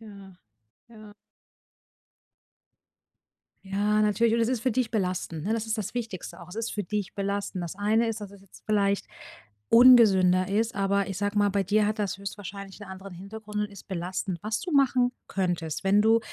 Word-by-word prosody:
Ja, 200 -4 -12 0.6
ja. 215 -2 -13 2.5
Ja, 205 +2 +1
natürlich. 220 +2 +2
Und 235 - +1
es 230 - +2
ist 255 -4 0
für 255 -3 +1
dich 250 -2 0
belastend, 180 -6 -2
ne? 210 - 0
Das 225 -1 -2
ist 220 0 -2
das 215 +1 -4
Wichtigste 225 -7 -5
auch. 175 - -12
Es 180 - -10
ist 225 0 -3
für 210 - -2
dich 205 +1 -4
belastend. 200 -2 -3
Das 170 +2 -6
eine 220 +3 +2
ist, 220 -1 -3
dass 200 -1 -8
es 200 - -14
jetzt 195 -1 -18
vielleicht 200 -2 +1 0.6
ungesünder 200 -7 +6
ist. 220 +3 0
Aber 200 0 +1
ich 195 - -4
sage 205 +1 -1
mal, 205 0 +4
bei 200 0 +1
dir 205 +2 +2
hat 215 +1 -2
das 200 -2 -2
höchstwahrscheinlich 200 0 -8
'n 205 - -9
anderen 190 0 -9
Hintergrund 210 +3 -8
und 210 0 -2
ist 200 - -13
belastend. 180 0 -3
Was 215 +1 -2
du 355 - -5
machen 255 -3 +3 0.2
könntest, 175 -4 -2
wenn 200 +2 +4
du 225 +1 +5
205 Hz, 185 wpm, -27 LUFS, 195-220 Hz, 2.5 s, ungesünder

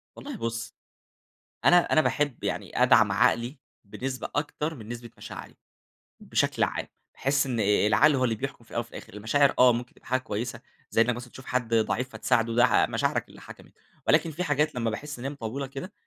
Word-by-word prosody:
والله 285 -3 -7
بُص 115 -3 -4 0.9
أنا 175 - +8 0.2
أنا 155 - +6
باحب 145 -5 -1
يعني - - -1
أدعم - - +5
عقلي 120 +4 +2 0.2
بنسبة 130 +5 -5
أكتر 150 +2 -2
من 110 -4 -11
نسبة 120 -1 -7
مشاعري، - - -9 0.6
بشكل - - 0
عام. - - -2 0.3
باحس 140 +1 +1
إن 120 -4 -2
العقل 105 +7 +4
هو 130 - +1
اللي 115 -3 +1
بيحكم 130 0 -6
في - - -22
الأول 120 - -1
وفي 120 - -13
الآخر - - -10
المشاعر 115 +7 +2
آه، 125 -1 +7
ممكن 120 +1 -5
تبقي - - -24
حاجة 130 +1 +1
كويسة 115 -1 -4 0.3
زي 115 - +4
إنك 120 0 +2
مثلًا 125 0 -9
تشوف 130 - -12
حد 120 -2 -1
ضعيف 120 +4 +1
فتساعده، 115 -4 +1
ده 120 -3 +5
مشاعرك - - -1
اللي - - -14
حكمت، - - -13 0.3
ولكن 165 - +4
في 180 +5 -3
حاجات 150 -3 +1
لمّا 115 -2 0
باحس 145 +4 -6
إن 130 - -7
هي - - 0
مطولة 135 +1 -5
كده 140 +10 -8
125 Hz, 190 wpm, -27 LUFS, 115-140 Hz, 0.9 s, أنا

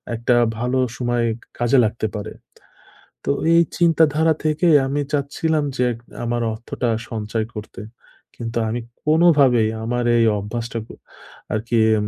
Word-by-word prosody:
একটা 120 +2 +1 0.2
ভালো 125 +3 -1 0.2
সময় 120 -1 0 0.3
কাজে 120 +3 +3
লাগতে 110 0 -2
পারে। 105 - -5 0.9
তো - - -2 0.2
এই 170 - +6 0.2
চিন্তাধারা 160 -2 +3
থেকে 155 +3 +1 0.2
আমি 145 +2 -1
চাচ্ছিলাম 150 +2 0
যে 125 - +1
এক 115 - -11 0.3
আমার 120 0 -1
অর্থটা 120 +2 -4 0.2
সঞ্চয় 110 0 -3
করতে। 105 -2 -8 0.5
কিন্তু 115 0 -5
আমি 120 +2 -2 0.2
কোনোভাবেই 145 -8 +4
আমার 120 +1 -1
এই 115 - +4
অভ্যাসটাক 115 +2 -5 0.7
আরকি 115 +2 -1 0.2
উম 105 - -2
120 Hz, 130 wpm, -21 LUFS, 115-145 Hz, 0.9 s, এই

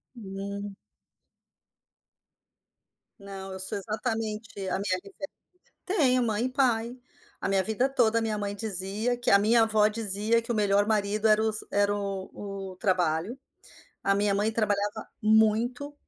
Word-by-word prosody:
Hum. 200 -1 -6 2.4
Não, 195 -1 -8
eu 190 - -7
sou 190 +3 0
exatamente 220 +1 -3 0.2
a - - 0
minha 185 -2 0
referência. 290 +9 -8 0.6
Tenho 265 -10 +3
mãe 225 0 0
e - - -1
pai. 245 -2 +1 0.4
A - - -2
minha 195 -1 +2
vida 220 +6 0
toda, 230 -4 +2
minha 220 -1 -1
mãe 205 0 -3
dizia 210 +3 -2
que 245 - 0
a 200 - +7
minha 225 +3 +4
avó 215 -1 +3
dizia 215 +1 0
que 230 - -4
o - - 0
melhor 205 -1 +3
marido 210 0 +1
era 215 0 +4
os 220 -1 0
era 205 0 +2
o 195 -2 -4 0.4
o - - -12
trabalho. 180 +3 0 0.7
A 195 - +2
minha 200 0 +2
mãe 205 +2 +1
trabalhava 205 -2 -1 0.2
muito, 220 +6 +2
210 Hz, 145 wpm, -27 LUFS, 200-225 Hz, 2.4 s, a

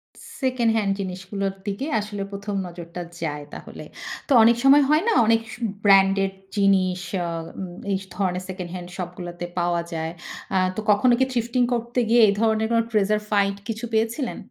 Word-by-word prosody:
স - - -17 0.2
second hand 225 -5 +2
জিনিসগুলোর 190 +1 -3
দিকে 205 +8 -3
আসলে 205 -1 -5
১ম 200 +1 -5
নজরটা 170 0 -8 0.2
যায় 150 -3 -3
তাহলে। - - -9 0.4
তো - - -6
অনেক 235 +1 +6
সময় 280 +2 +7
হয় 305 +3 +4
না - - +3
অনেক 225 0 +4 0.4
ব্র্যান্ড 195 -1 +6
এর 195 - -1 0.3
জিনিস 190 -2 +3 0.2
আ - - -2 0.3
উম 185 -2 -6 0.2
এই 195 - +2 0.2
ধরনের 185 -1 -1
সেকেন্ড-হ্যান্ড 180 -1 -6
শপ 180 -2 -4
গুলোতে 175 -1 -6
পাওয়া 175 0 +1
যায়। 160 0 -3 0.4
অ্যা 190 - +2 0.2
তো - - -3
কখনো 240 +5 +4
কি 260 - +4
Thrifting 240 0 +1
করতে 235 +1 -1
গিয়ে 235 +1 +6
এই 200 - +3
ধরনের 220 -1 +2
কোন 230 0 +4
Treasure 210 0 +2
Fight 200 -1 +2
কিছু 225 +1 -4
পেয়েছিলেন? 230 +4 0
200 Hz, 170 wpm, -23 LUFS, 185-230 Hz, 0.4 s, সময়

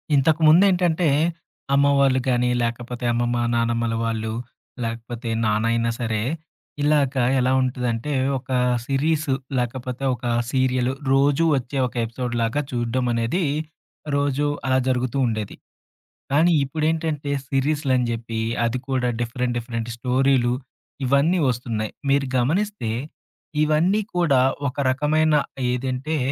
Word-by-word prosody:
ఇంతకుముందేంటంటే, 165 +4 +4 0.7
అమ్మ 140 0 +4
వాళ్ళు 135 -1 +4
గానీ, 125 0 +2
లేకపోతే 120 +1 -4
అమ్మమ్మ, 120 0 0 0.2
నానమ్మల 115 0 0
వాళ్ళు. 110 -1 -2 0.5
లేకపోతే 115 +1 -5 0.2
నాన్నయినా 115 +2 +1
సరే. 115 -3 -1 0.6
ఇలాగా 145 -3 +2 0.2
ఎలా 130 +1 +2
ఉంటుందంటే, 125 +1 -1 0.3
ఒక 130 - -23 0.4
సిరీసు 145 +2 0 0.2
లేకపోతే 125 +1 -3
ఒక 120 - -10 0.3
సీరియలు 130 -1 +1 0.2
రోజూ 140 +4 +3
వచ్చే 130 +2 -4
ఒక 125 - -13
ఎపిసోడ్‌లాగా 120 +2 -2
చూడడం 120 +1 -1
అనేది 115 +11 0 0.7
రోజు 140 0 +1 0.2
అలా 130 0 +2
జరుగుతూ 130 0 0
ఉండేది. 110 -3 -3 0.8
కానీ 160 +5 +4
ఇప్పుడేంటంటే, 155 0 -1 0.2
సీరీసులని 135 -2 +1
జెప్పి 115 -1 -4 0.2
అది 115 +2 -1
కూడా 130 -2 +1
డిఫరెంట్ 120 +1 -2
డిఫరెంట్ 115 -1 -5
స్టోరీలు. 125 0 +2 0.5
ఇవన్నీ 140 +7 +3
వస్తున్నాయి. 115 -3 -2 0.2
మీరు 140 0 +3
గమనిస్తే, 165 - 0 0.7
ఇవన్నీ 165 +7 +2
కూడా 155 -7 +3 0.3
ఒక 130 - -12 0.2
రకమైన 150 +3 +2 0.4
ఏదంటే, 130 +5 -2
130 Hz, 105 wpm, -23 LUFS, 120-145 Hz, 0.8 s, ఇంతకుముందేంటంటే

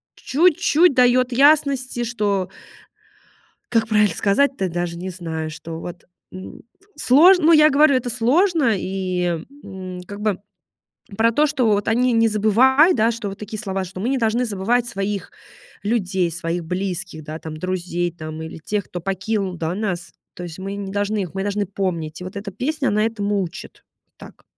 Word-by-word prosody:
чуть-чуть 330 +1 +3
даёт 250 0 +3
ясности, 275 -2 +3
что 205 -5 -1 1.2
как 225 -1 +2
правильно 210 -2 +3
сказать-то, 200 -1 +1
даже 170 0 -3
не 185 +2 -5
знаю, 165 -3 -5
что 160 +1 -8
вот, 175 -1 -8 0.3
м, 185 0 -10 0.3
сложно, 325 +6 +5
ну, 335 - +7
я 305 -1 +7
говорю, 285 +1 +5
это 250 -1 0
сложно 260 - +2
и, 180 -3 -2 0.2
м, 185 -2 -8
как 205 0 -8
бы 210 -3 -1 0.8
про 230 +2 +3
то, 300 +6 +3
что 270 -5 0
вот 205 -1 +1
они 245 +2 +2
не 230 0 +3
забывают, 255 - +4
да, 225 +1 +3
что 230 -3 -4
вот 195 - -9
такие 210 +1 -6
слова, 195 -3 -3
что 185 +1 -9
мы 230 - -1
не 275 - +1
должны 230 +2 +1
забывать 230 +3 0
своих 195 -2 -4 0.5
людей, 190 -5 0
своих 170 +1 -3
близких, 180 -3 -4
да, 155 +1 -7
там 155 -1 -7
друзей, 175 0 -2
там 155 -1 -8
или 160 - -8
тех, 205 -2 -1
кто 175 - -7
покинул, 195 0 -2
да, 165 +1 -3
нас. 190 -5 -3 0.2
То 175 - -7
есть 170 +1 -8
мы 195 +1 -5
не 195 -1 -6
должны 205 +1 -1
их 180 -1 -7
мы 195 - -2
должны 205 0 -1
помнить. 175 -5 -3
И - - -7
вот 185 +2 -8
эта 200 -1 -6
песня, 280 +6 -2
она 210 +1 +2
этому 205 -3 -1
учит, 175 0 -9 0.3
так. - - -15
205 Hz, 175 wpm, -21 LUFS, 180-240 Hz, 1.2 s, ну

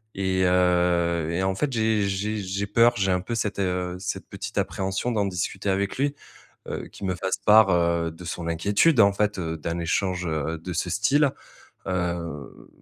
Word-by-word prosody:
et 95 -1 0
heu, 90 -2 +2
et 90 +3 -1
en 95 0 +1
fait, 135 +8 -1
j'ai 110 -3 +1
j'ai 105 +3 -2
j'ai 100 0 -3
peur. 115 +3 +4
J'ai 95 -2 +1
un 90 0 +1
peu 115 +6 -4
cette, 105 -3 -2
heu, 90 -1 -1
cette 100 - -4
petite - - -7
appréhension 95 +5 -1
d'en 105 -3 +1
discuter 95 +1 -3
avec 100 +1 -1
lui, 140 +1 +1 0.5
heu, - - -5
qu'il 100 - -6
me 90 - -1
fasse 95 +1 -2
part, 105 -1 +6
heu, 85 -1 +1
de 80 +2 -12
son 85 -1 -5
inquiétude, 100 - +2
en 100 -2 +6
fait, 105 -1 0
heu, 80 -2 -3
d'un 85 +2 -3
échange, 90 +1 -1
heu, 80 +1 -2
de 90 +3 -6
ce 85 +1 -2
style, 135 - +3 0.6
heu, 85 -5 -4
95 Hz, 185 wpm, -25 LUFS, 85-105 Hz, 0.6 s, part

